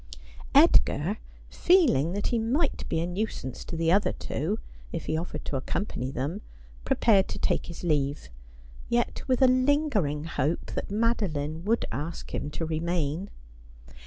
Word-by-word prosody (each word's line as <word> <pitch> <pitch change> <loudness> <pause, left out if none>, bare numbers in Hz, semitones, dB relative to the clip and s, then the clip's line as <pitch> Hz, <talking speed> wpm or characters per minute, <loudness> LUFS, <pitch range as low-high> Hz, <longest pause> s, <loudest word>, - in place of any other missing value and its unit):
Edgar, 150 - +5 0.3
feeling 255 - +4
that 205 +1 -1
he 235 - +1
might 270 +7 0
be - - 0
a - - 0
nuisance 180 - -4
to 165 - -5
the 165 0 +2
other 200 +3 +3
two 175 +10 -2 0.3
if 165 - -4
he 155 - -1
offered 165 +3 -4
to 140 - -2
accompany 130 -2 -3
them, 140 - -3 0.4
prepared 225 -7 +3
to - - -5
take - - 0
his 170 - -8
leave, 145 - 0 0.6
yet 240 0 0
with 260 0 +3
a - - +8
lingering 255 - +2
hope 155 0 -2
that - - -4
Madoline 185 -9 -1
would 230 +3 +1
ask 160 +4 -5
him 145 - -2
to 165 +2 -4
remain. 165 +2 -1
175 Hz, 150 wpm, -27 LUFS, 150-225 Hz, 0.6 s, a